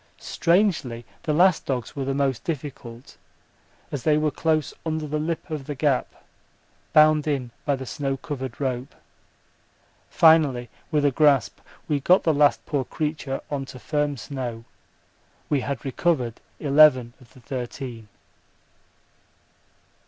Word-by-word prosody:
Strangely 165 Hz, -, 0 dB, 0.2 s
the 155 Hz, -, -2 dB
last 175 Hz, +2 st, +3 dB
dogs 125 Hz, -3 st, -3 dB
were 140 Hz, -2 st, -3 dB
the 135 Hz, 0 st, -1 dB
most 135 Hz, -3 st, 0 dB
difficult, 130 Hz, -5 st, -7 dB, 0.7 s
as 140 Hz, -, -3 dB
they 150 Hz, +3 st, +3 dB
were 155 Hz, 0 st, +1 dB
close 155 Hz, -1 st, 0 dB
under 160 Hz, -1 st, -2 dB
the 150 Hz, +1 st, -2 dB
lip 160 Hz, +2 st, -3 dB
of 150 Hz, -4 st, -4 dB
the 145 Hz, -, -4 dB
gap, 140 Hz, -2 st, -1 dB, 0.7 s
bound 155 Hz, 0 st, +5 dB
in 135 Hz, -5 st, -1 dB
by 145 Hz, -, +2 dB
the 130 Hz, 0 st, -7 dB
snow 135 Hz, +1 st, -3 dB
covered 130 Hz, -4 st, -6 dB
rope. 130 Hz, -2 st, -3 dB, 1.1 s
Finally, 145 Hz, -8 st, +4 dB, 0.2 s
with 150 Hz, -2 st, +1 dB
a 145 Hz, -, +4 dB
gasp 145 Hz, 0 st, +3 dB, 0.3 s
we 150 Hz, -2 st, +1 dB
got 180 Hz, +7 st, +4 dB
the 160 Hz, -, +3 dB
last 145 Hz, 0 st, +3 dB
poor 140 Hz, -3 st, -1 dB
creature 150 Hz, -1 st, -3 dB
on 140 Hz, -2 st, -2 dB
to 130 Hz, -, -10 dB
firm 145 Hz, +1 st, -1 dB
snow. 120 Hz, -2 st, -6 dB, 0.8 s
We 145 Hz, -, +2 dB
had 140 Hz, -1 st, -4 dB
recovered 130 Hz, -4 st, 0 dB, 0.2 s
eleven 140 Hz, -5 st, +5 dB
of 120 Hz, -3 st, -20 dB
the -, -, -14 dB
thirteen. 125 Hz, -2 st, -6 dB
140 Hz, 135 wpm, -24 LUFS, 130-155 Hz, 1.1 s, bound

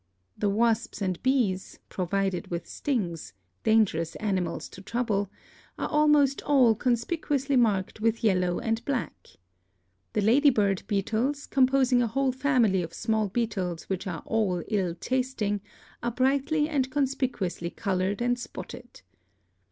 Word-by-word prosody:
The 205 Hz, -, 0 dB
wasps 230 Hz, +2 st, +1 dB
and 185 Hz, -3 st, -2 dB
bees, 240 Hz, -8 st, 0 dB
provided 190 Hz, 0 st, -1 dB
with 170 Hz, -1 st, -4 dB
stings 185 Hz, -, -3 dB
— 90 Hz, +1 st, -47 dB
dangerous 200 Hz, -7 st, +2 dB
animals 190 Hz, -4 st, -2 dB
to 190 Hz, -, -12 dB
trouble 205 Hz, -2 st, -1 dB, 0.2 s
— -, -, -28 dB
are -, -, -2 dB
almost 295 Hz, -2 st, +3 dB
all 260 Hz, -6 st, +4 dB
conspicuously 270 Hz, +4 st, 0 dB
marked 215 Hz, -4 st, +1 dB
with 225 Hz, +1 st, +1 dB
yellow 180 Hz, -4 st, +2 dB
and 225 Hz, 0 st, -1 dB
black. 270 Hz, -3 st, -3 dB, 0.9 s
The 210 Hz, -, +1 dB
lady 260 Hz, +8 st, +5 dB
bird 200 Hz, -6 st, +1 dB
beetles, 225 Hz, +8 st, -1 dB
composing 260 Hz, -1 st, +3 dB
a 240 Hz, -, +1 dB
whole 270 Hz, +4 st, +1 dB
family 250 Hz, -8 st, +2 dB
of 165 Hz, -1 st, -6 dB
small 220 Hz, -1 st, 0 dB
beetles 190 Hz, -6 st, -2 dB
which 190 Hz, 0 st, -3 dB
are 170 Hz, -4 st, -5 dB
all 195 Hz, -6 st, 0 dB
ill 185 Hz, -6 st, 0 dB
tasting, 235 Hz, -2 st, -1 dB, 0.4 s
are 235 Hz, -, 0 dB
brightly 275 Hz, +5 st, +1 dB
and 275 Hz, -4 st, 0 dB
conspicuously 255 Hz, -11 st, -1 dB
colored 195 Hz, +3 st, -1 dB
and 245 Hz, 0 st, +1 dB
spotted. 245 Hz, -, -9 dB
225 Hz, 135 wpm, -27 LUFS, 195-260 Hz, 0.9 s, lady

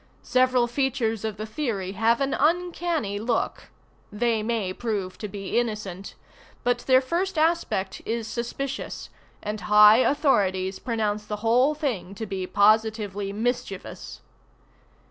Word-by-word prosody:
Several 255 Hz, -1 st, +3 dB
features 240 Hz, -3 st, -1 dB
of 215 Hz, -2 st, -3 dB
the 215 Hz, -, -4 dB
theory 220 Hz, -7 st, -3 dB
have 225 Hz, +5 st, +2 dB
an 275 Hz, 0 st, 0 dB
uncanny 330 Hz, -, 0 dB
look. 230 Hz, +1 st, -2 dB, 0.4 s
They 225 Hz, +1 st, 0 dB
may 215 Hz, -4 st, -1 dB
prove 200 Hz, -4 st, -3 dB
to 210 Hz, -, -4 dB
be 200 Hz, +3 st, -2 dB
innocent: 210 Hz, -5 st, -4 dB, 0.5 s
but 245 Hz, 0 st, +1 dB
their 260 Hz, -1 st, +6 dB
first 350 Hz, +6 st, -2 dB
aspect 310 Hz, -, 0 dB
is 230 Hz, 0 st, -3 dB
suspicious, 245 Hz, +4 st, -5 dB, 0.3 s
and 210 Hz, 0 st, -4 dB
high 210 Hz, +1 st, +7 dB
authorities 195 Hz, -9 st, +2 dB
pronounce 215 Hz, -3 st, -1 dB
the 210 Hz, +1 st, -5 dB
whole 250 Hz, +6 st, +4 dB
thing 245 Hz, -, -3 dB
to 220 Hz, -, -5 dB
be 190 Hz, -2 st, -4 dB
positively 210 Hz, -1 st, +2 dB
mischievous. 215 Hz, -2 st, -4 dB
225 Hz, 125 wpm, -25 LUFS, 205-255 Hz, 0.5 s, high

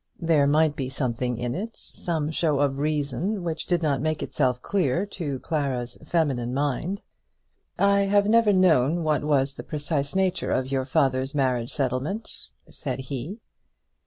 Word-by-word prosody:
There 160 Hz, -4 st, +3 dB
might 150 Hz, +1 st, +3 dB
be 130 Hz, -2 st, -3 dB
something 125 Hz, -2 st, -2 dB
in 120 Hz, 0 st, -2 dB
it, 220 Hz, +6 st, -4 dB
some 160 Hz, -3 st, -3 dB
show 155 Hz, -3 st, +1 dB
of 140 Hz, -1 st, +1 dB
reason 155 Hz, -, -1 dB
which 165 Hz, -2 st, -3 dB
did 175 Hz, -2 st, +1 dB
not 140 Hz, -4 st, +1 dB
make 155 Hz, 0 st, -1 dB
itself 125 Hz, -4 st, 0 dB
clear 180 Hz, 0 st, 0 dB
to 160 Hz, -9 st, -4 dB
Clara's 135 Hz, -6 st, -2 dB
feminine 135 Hz, -7 st, 0 dB
mind. 145 Hz, -, -1 dB, 0.7 s
"I 200 Hz, 0 st, +4 dB
have 200 Hz, +1 st, +3 dB
never 225 Hz, -1 st, +5 dB
known 170 Hz, -4 st, +3 dB
what 150 Hz, -2 st, +1 dB
was 140 Hz, -2 st, +2 dB
the -, -, -8 dB
precise 145 Hz, 0 st, -2 dB
nature 190 Hz, -1 st, +1 dB
of 130 Hz, +1 st, 0 dB
your 135 Hz, -1 st, 0 dB
father's 130 Hz, +1 st, +1 dB
marriage 125 Hz, -4 st, +1 dB
settlement," 140 Hz, -, -3 dB, 0.2 s
said 130 Hz, -4 st, -3 dB
he. 140 Hz, -, -5 dB
145 Hz, 155 wpm, -25 LUFS, 130-170 Hz, 0.7 s, never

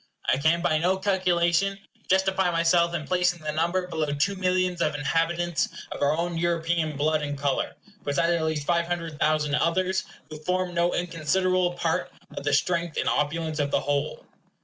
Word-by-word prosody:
I 130 Hz, -, +2 dB
can 165 Hz, +4 st, +2 dB
by 155 Hz, -3 st, +2 dB
no 180 Hz, +3 st, +2 dB
calculation 185 Hz, -1 st, +1 dB, 0.3 s
justify 190 Hz, 0 st, +2 dB
myself 170 Hz, 0 st, +2 dB
in 155 Hz, -3 st, -3 dB
placing 180 Hz, 0 st, +1 dB
the 155 Hz, -, -2 dB
number 170 Hz, +4 st, 0 dB
below 160 Hz, -3 st, -2 dB
two 145 Hz, +7 st, 0 dB
millions 185 Hz, -1 st, 0 dB
of 150 Hz, -, +1 dB
inhabitants 165 Hz, +3 st, 0 dB, 0.2 s
of -, -, -6 dB
our 145 Hz, +2 st, +2 dB
own 170 Hz, 0 st, -2 dB
European 165 Hz, -2 st, 0 dB
blood 155 Hz, +2 st, +1 dB
and 145 Hz, -1 st, -3 dB
color, 140 Hz, -1 st, -1 dB, 0.3 s
besides 145 Hz, +4 st, +1 dB
at 170 Hz, -1 st, +1 dB
least 155 Hz, -2 st, -1 dB
five 170 Hz, 0 st, +1 dB
hundred 165 Hz, -3 st, -4 dB
thousand 150 Hz, -1 st, +1 dB
others, 185 Hz, +5 st, +1 dB, 0.3 s
who 155 Hz, -, -7 dB
form 180 Hz, +3 st, -1 dB
no 170 Hz, +1 st, +1 dB
inconsiderable 180 Hz, +2 st, +1 dB
part 165 Hz, -2 st, -1 dB, 0.2 s
of -, -, -5 dB
the 145 Hz, 0 st, 0 dB
strength 170 Hz, +1 st, 0 dB
and -, -, 0 dB
opulence 155 Hz, +1 st, 0 dB
of 145 Hz, -1 st, +1 dB
the -, -, +1 dB
whole. 145 Hz, -1 st, -2 dB
170 Hz, 175 wpm, -26 LUFS, 155-180 Hz, 0.3 s, I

